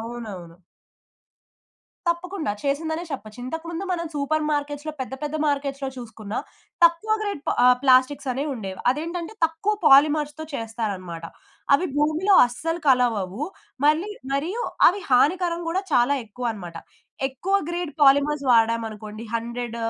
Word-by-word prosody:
అవునవును. 215 -8 -8 1.5
తప్పకుండా. 345 - -1
చేసిందనే 315 +4 -1
చెప్పొచ్చు. 215 -5 -7
ఇంతకు 320 +6 -5
ముందు 340 +3 -4
మనం 340 -1 -2
సూపర్ 305 +2 0
మార్కెట్స్‌లో 290 +1 -3
పెద్ద, 260 - -4
పెద్ద 300 +1 -2
మార్కెట్స్‌లో 275 -1 -1
చూసుకున్న, 220 -3 -8 0.5
తక్కువ 340 +6 +3
గ్రేట్ 405 -9 -3 0.2
ఆహ్, 250 0 +7
ప్లాస్టిక్స్ 265 +1 +4
అనేవి 280 +4 -2
ఉండేవి. 195 -5 -6
అదేంటంటే, 335 +6 -3
తక్కువ 330 +6 0
పాలిమర్స్‌తో 295 +2 +5
చేస్తారన్నమాట. 205 -8 -4 0.5
అవి 350 +6 +2
భూమిలో 310 +7 +3
అస్సలు 330 +8 -4
కలవవు. 235 -4 +2 0.4
మళ్ళీ 320 +7 +2 0.2
మరియు 340 +12 -1 0.3
అవి 400 +4 -1
హానికరం 340 +7 +3
గూడా 365 +4 0
చాలా 245 +2 +4
ఎక్కువన్నమాట. 215 -6 -5 0.5
ఎక్కువ 280 +9 -3
గ్రేడ్ 345 -2 -3
పాలిమర్స్ 285 +1 +4
వాడామనుకోండి 225 -2 +1
100 235 0 -3
280 Hz, 120 wpm, -24 LUFS, 230-325 Hz, 1.5 s, ఆహ్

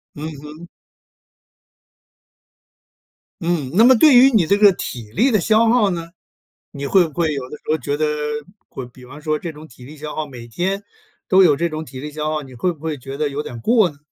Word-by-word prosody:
嗯 150 +2 -6
哼。 155 +3 -11 2.7
嗯， 165 -6 -1
那 210 +6 +5
么 260 +2 +7
对 290 +3 +6
于 255 +2 +8
你 210 -8 +3
这 200 +6 +2
个 205 -1 +7
体 115 -10 -7
力 240 - +2
的 215 - +3
消 220 +5 +3
耗 225 -3 +3
呢？ 170 -2 -5 0.6
你 140 0 -6
会 180 +3 +4
不 155 - -13
会 165 -3 0
有 135 -3 -5
的 150 - -7
时 - - -40
候 155 - +2
觉 145 -1 -3
得 155 - 0 0.6
会 130 - -7
比 125 +1 -16
方 145 +4 -12
说 155 -1 -1
这 170 0 -6
种 155 +1 -13
体 125 +1 -15
力 150 +5 -12
消 150 0 -7
耗 155 - -2
每 120 -4 -11
天 190 - -2 0.5
都 190 0 +6
有 160 - +5
这 170 +2 0
种 155 0 -5
体 130 -4 -10
力 150 +2 -6
消 150 +1 -4
耗， 155 -1 -2
你 130 -2 -13
会 175 +9 -1
不 160 - -18
会 155 -2 -4
觉 135 +2 -8
得 150 0 -1
有 145 +1 -4
点 120 -5 -8
过 220 - +3
呢？ 145 - -19
155 Hz, 240 characters per minute, -20 LUFS, 140-185 Hz, 2.7 s, 于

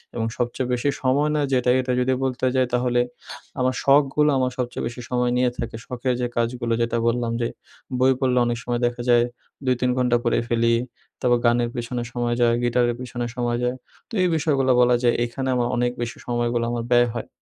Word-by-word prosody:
এবং 115 -1 -1
সবচেয়ে 120 +1 -2
বেশি 125 +4 0
সময় 140 +3 +2
নেয় 145 -2 +1
যেটাই 125 0 +3
এটা 125 0 -2
যদি 130 +1 +2
বলতে 130 -1 -1
যায়। 130 -1 +3
তাহলে 125 0 +2 0.6
আমার 130 0 +2
শখগুলো 145 +2 +4
আমার 130 -1 +1
সবচেয়ে 125 -1 -3
বেশি 120 +1 -7
সময় 125 -1 +1
নিয়ে 125 0 +3
থাকে, 115 0 -4
শখের 125 0 -2
যে 120 - 0
কাজগুলো 120 0 -1
যেটা 115 0 0
বললাম 115 0 0
যে 115 - +1 0.5
বই 130 +1 +5
পড়লে 125 -2 +2
অনেক 120 0 -1
সময় 120 -1 -1
দেখা 120 0 -2
যায় 120 -1 +5 0.4
২-৩ 125 0 +1
ঘণ্টা 125 -1 +3
পড়ে 120 - +2
ফেলি। 115 0 +2 0.5
তারপর 120 -2 +3
গানের 120 0 +3
পেছনে 120 0 -3
সময় 120 -1 -1
যায়। 115 0 +4
গিটারের 120 0 +2
পেছনে 125 -1 -4
সময় 120 -1 -1
যায়। 125 +1 0 0.3
তো - - -16
এই - - +3
বিষয়গুলো 140 -4 +2
বলা 125 0 +5
যায় 120 - +4
এখানে 130 +3 -4
আমার 120 -1 +1
অনেক 120 0 +1
বেশি 120 -1 -4
সময়গুলো 120 -1 0
আমার 120 -1 -2
ব্যয় 120 0 +5
হয়। - - -4
120 Hz, 195 wpm, -23 LUFS, 120-130 Hz, 0.6 s, বই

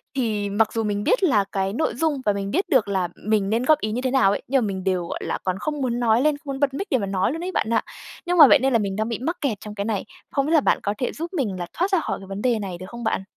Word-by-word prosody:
thì 215 -5 -1
mặc 215 +2 +1
dù 225 -1 -1
mình 205 -1 -1
biết - - +2
là 215 - +4
cái 195 0 -1
nội 315 - 0
dung 305 -4 0
và 205 - +3
mình 200 0 -3
biết 370 +8 0
được 255 -7 +3
là 190 -3 0 0.2
mình 210 -2 +2
nên 230 +3 +1
góp 305 +2 +4
ý 215 - -2
như 245 +3 -2
thế 260 -1 -1
nào 260 -8 +4
ấy, - - -2
nhưng 265 -2 +2
mà - - 0
mình 190 -2 -4
đều 185 -2 0
gọi - - -4
là - - -2
còn 185 -1 0
không 295 +3 -3
muốn 240 -2 -1
nói 235 0 +3
lên, 300 0 +2
không 300 - -29
muốn 270 - -6
bật 280 -2 +1
mic 395 +8 -4
để 260 - +4
mà 200 - -2
nói 195 +4 0
luôn 330 +3 -4
ấy 370 - -3
bạn 225 - -1
ạ. - - +2 0.4
Nhưng 355 0 0
mà 300 -4 +10
vậy 290 - +6
nên 265 0 +1
là 230 - +4
mình 195 -2 -2
đang 215 +2 -1
bị 230 - -3
mắc 325 +7 -2
kẹt 230 -8 -1
trong 210 -1 -8
cái 200 0 -3
này, 215 -4 -2 0.3
không 275 0 +1
biết 320 - 0
là 315 - +7
bạn - - +2
có 205 - 0
thể 250 - -1
giúp 335 +4 -6
mình 235 - -1
là 175 - -4
thoát 375 +3 0
ra 370 - +4
khỏi - - -3
cái 195 - -11
vấn 195 +1 -5
đề 240 -3 +1
này 190 -4 -5
được 185 - -8
không 235 0 -8
bạn? 220 -3 -1
230 Hz, 340 wpm, -23 LUFS, 200-280 Hz, 0.4 s, mà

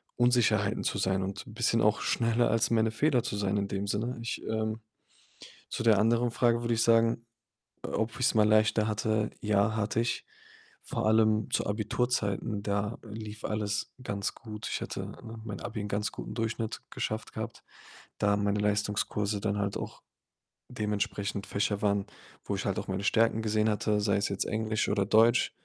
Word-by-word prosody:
Unsicherheiten 115 -4 +3
zu - - 0
sein 95 0 +1
und 95 +1 -5
'n - - -10
bisschen 115 -1 +2
auch 105 0 +3
schneller 115 0 +2
als 115 +1 +2
meine 110 -1 +3
Fehler 125 +2 +2
zu 115 -4 -3
sein 100 0 0
in 100 -1 0
dem 100 +1 -2
Sinne. 115 +5 -1
Ich, 115 - -4
ähm 110 0 -1 0.9
zu - - -3
der 110 -3 +5
anderen 115 +2 +3
Frage 120 0 +2
würde 120 0 0
ich 115 - +2
sagen, 115 0 +3 0.6
äh, - - -3
ob 110 0 -2
ich's 125 0 +3
mal 105 -1 +5
leichter 110 0 +4
hatte. 110 0 0
Ja, 105 +1 +2
hatte 110 +1 0
ich, 115 - -1 0.6
vor - - -2
allem 110 -1 +3
zu - - +1
Abiturzeiten, 105 -1 -1
da 100 +2 -1
lief 110 -1 -8
alles 105 -1 -2
ganz 100 -5 -2
gut. 105 -2 -7
Ich - - -2
hatte, - - -4
ne, 110 0 -9
mein 105 -3 -6
Abi 115 -1 -5
'n 105 - -3
ganz 105 +1 -1
guten - - -7
Durchschnitt 115 -1 -2
geschafft - - -3
gehabt, - - -5 0.6
da 100 0 +3
meine 100 0 +1
Leistungskurse 105 0 0
dann 105 -1 -1
halt 100 -1 -1
auch - - -6 0.7
dementsprechend 100 -1 -2
Fächer 100 +1 0
waren, 100 -1 +1 0.4
wo 100 - -1
ich 95 - -4
halt 100 -2 0
auch - - -6
meine 95 +1 -2
Stärken 115 +1 +3
gesehen 110 0 +2
hatte, 105 0 +1
sei 100 -1 +2
es 100 - 0
jetzt 100 - -1
Englisch 110 0 -1
oder 100 -1 +2
Deutsch. 115 +3 +5
110 Hz, 180 wpm, -30 LUFS, 100-115 Hz, 0.9 s, der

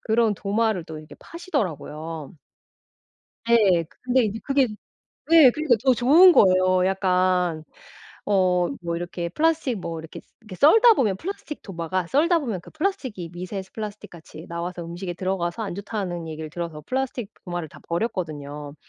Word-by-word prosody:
그런 220 -1 +2
도마를 205 -2 0
또 160 -1 -8
이렇게 155 0 -12
파시더라고요. 165 - -5 1.1
네. 195 -8 +4 0.2
근데 255 0 +2
이제 215 +1 -3
그게 275 -2 +3 0.6
예 320 -6 +8
그니까 300 -1 +2
더 260 -2 +5
좋은 315 +10 +7
거예요. 185 - +4
약간 185 -3 +1 0.6
어 180 -3 +2
뭐 170 -1 -2
이렇게 175 0 -4
플라스틱 300 - 0
뭐 165 -2 -5
이렇게 160 0 -10 0.2
이렇게 215 -4 -11
썰다 450 - +7
보면 210 - +1
플라스틱 335 - -7
도마가 180 -1 -3
썰다 335 +5 +3
보면 225 - -3
그 - - -14
플라스틱이 270 - -3
미세 185 +2 -5
플라스틱같이 200 -7 -9
나와서 170 +1 -5
음식에 175 +1 -6
들어가서 185 +2 -2
안 195 - -4
좋다는 190 -5 -4
얘기를 155 0 -6
들어서 165 -2 -6
플라스틱 255 -4 -3
도마를 175 -3 -4
다 - - -15
버렸거든요. 155 -7 -4
185 Hz, 355 characters per minute, -24 LUFS, 170-240 Hz, 1.1 s, 예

